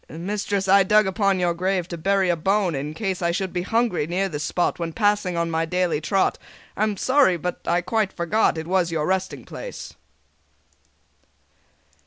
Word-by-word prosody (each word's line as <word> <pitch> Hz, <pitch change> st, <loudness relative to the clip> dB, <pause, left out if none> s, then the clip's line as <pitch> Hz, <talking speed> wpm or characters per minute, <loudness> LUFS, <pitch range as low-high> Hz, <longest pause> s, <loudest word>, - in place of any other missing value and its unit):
"Mistress, 195 Hz, +3 st, -3 dB
I 195 Hz, +1 st, +6 dB
dug 210 Hz, +2 st, +4 dB
upon 195 Hz, 0 st, +1 dB
your 175 Hz, -1 st, +1 dB
grave 180 Hz, 0 st, -1 dB
To 170 Hz, -, -4 dB
bury 190 Hz, +2 st, +1 dB
a 175 Hz, -, +3 dB
bone, 190 Hz, +2 st, +1 dB
in 145 Hz, +2 st, -4 dB
case 190 Hz, -3 st, -3 dB
I 170 Hz, -, +1 dB
should 185 Hz, +2 st, -2 dB
be 175 Hz, -, -1 dB
hungry 225 Hz, -5 st, 0 dB
near 185 Hz, +3 st, 0 dB
this 150 Hz, -3 st, -4 dB
spot 175 Hz, +2 st, -1 dB
When 165 Hz, -1 st, -3 dB
passing 205 Hz, -4 st, +1 dB
on 170 Hz, 0 st, -1 dB
my 160 Hz, 0 st, 0 dB
daily 175 Hz, -2 st, 0 dB
trot. 190 Hz, +5 st, +1 dB, 0.4 s
I -, -, -4 dB
am 215 Hz, -2 st, +1 dB
sorry, 260 Hz, -6 st, +3 dB
but 180 Hz, +2 st, -4 dB
I 175 Hz, +1 st, +2 dB
quite 215 Hz, +2 st, 0 dB
forgot 170 Hz, +2 st, +1 dB
It 160 Hz, -, -4 dB
was 180 Hz, -1 st, +1 dB
your 155 Hz, -2 st, -1 dB
resting 190 Hz, +1 st, -2 dB
place." -, -, -8 dB
185 Hz, 185 wpm, -23 LUFS, 170-200 Hz, 0.4 s, I